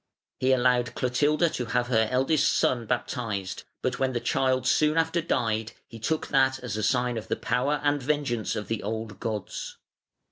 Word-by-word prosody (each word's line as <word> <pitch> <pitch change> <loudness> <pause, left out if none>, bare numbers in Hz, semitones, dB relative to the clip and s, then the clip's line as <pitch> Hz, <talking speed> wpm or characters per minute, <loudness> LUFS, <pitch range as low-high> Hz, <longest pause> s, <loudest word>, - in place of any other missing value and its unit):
He 130 +1 +2
allowed 125 -1 +2
Clotilda 145 +6 +2
to 125 - -3
have 120 +1 0
her 110 -3 +3
eldest 135 +4 +2
son 120 -3 +1
baptised, 110 -6 -3 0.2
but - - -1
when 130 -1 +1
the 120 - 0
child 130 0 +1
soon 150 +4 +3
after 165 +1 +2
died, 110 -7 -1
he 115 - -11
took 155 +8 -1
that 135 -1 +3
as 115 -5 -3
a 110 - -2
sign 125 +1 +1
of 110 - -11
the - - 0
power 135 +5 0
and 145 -1 +2
vengeance 135 -5 -1
of 105 - -4
the 115 -2 -2
old 110 -1 -4
gods. 110 -4 -4
125 Hz, 180 wpm, -27 LUFS, 115-135 Hz, 0.2 s, her